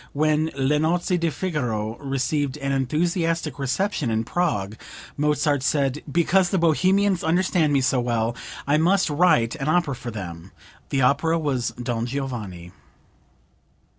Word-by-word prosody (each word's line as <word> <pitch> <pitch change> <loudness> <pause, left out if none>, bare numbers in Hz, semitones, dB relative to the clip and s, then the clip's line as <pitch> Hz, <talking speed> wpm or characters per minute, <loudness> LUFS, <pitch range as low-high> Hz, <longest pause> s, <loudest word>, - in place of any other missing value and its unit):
When 155 +1 +1
"Le 140 +2 +1
Nozze 175 +3 +1
di 170 -1 0
Figaro" 120 - -2
received 135 +1 -1
an 140 -1 -3
enthusiastic 165 +2 -1
reception 140 - -1
in 110 0 0
Prague, 110 - -1 0.4
Mozart 150 -1 +1
said: 140 0 0
"Because 175 +4 +3
the 190 - +1
Bohemians 185 +3 +2
understand 170 -2 +2
me 140 -2 +3
so 130 0 +2
well 120 -1 0 0.3
I 145 +2 +3
must 175 +1 +2
write 150 -7 +3
an 140 -1 -4
opera 155 -2 +2
for 125 -1 -7
them." 90 -4 -8 0.4
The 135 -2 +1
opera 155 +6 +2
was 135 -7 -1
"Don 120 -1 -2
Giovanni.") 115 -10 -5
145 Hz, 135 wpm, -23 LUFS, 125-165 Hz, 0.4 s, Because